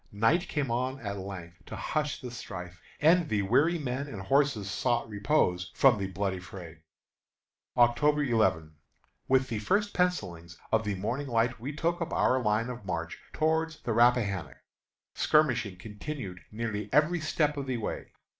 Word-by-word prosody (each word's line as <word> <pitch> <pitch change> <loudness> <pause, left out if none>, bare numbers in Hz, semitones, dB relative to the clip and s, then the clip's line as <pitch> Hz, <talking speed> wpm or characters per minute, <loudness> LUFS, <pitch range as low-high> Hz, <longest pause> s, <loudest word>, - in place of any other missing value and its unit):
Night 115 - +2
came 140 -5 -1
on 130 +3 -1
at 100 -2 -4
length 90 -3 -8
to - - -6
hush 150 -2 -2
the 125 - -6
strife, 90 -7 -8 0.2
and 165 +1 +4
the 105 -2 +1
weary 145 - +3
men 140 -1 -3
and 110 -8 -7
horses 135 0 +1
sought 120 +4 0
repose 100 - +1
from 130 -6 +5
the 95 - -2
bloody 95 -1 -2
fray. 90 -3 -10 1.0
October 145 +5 +4
11. 110 - +1 0.5
With 130 0 +3
the 110 - -2
first 205 - +1
pencilings 90 - -1
of 110 -1 +2
the 105 -1 -1
morning 125 +9 -3
light 120 0 +1
we 130 +5 -4
took 170 +3 -1
up 170 - -2
our 130 0 +3
line 110 +1 +1
of 120 -3 -8
march 85 -3 -4
toward 160 +1 +1
the 115 - -1
Rappahannock. 110 - +2 0.6
Skirmishing 125 -11 +2
continued 105 -1 -7
nearly 105 -2 -3
every 155 +5 +3
step 155 -1 0
of 140 -2 -4
the 130 -2 -1
way. 110 - -4
120 Hz, 160 wpm, -29 LUFS, 100-145 Hz, 1.0 s, from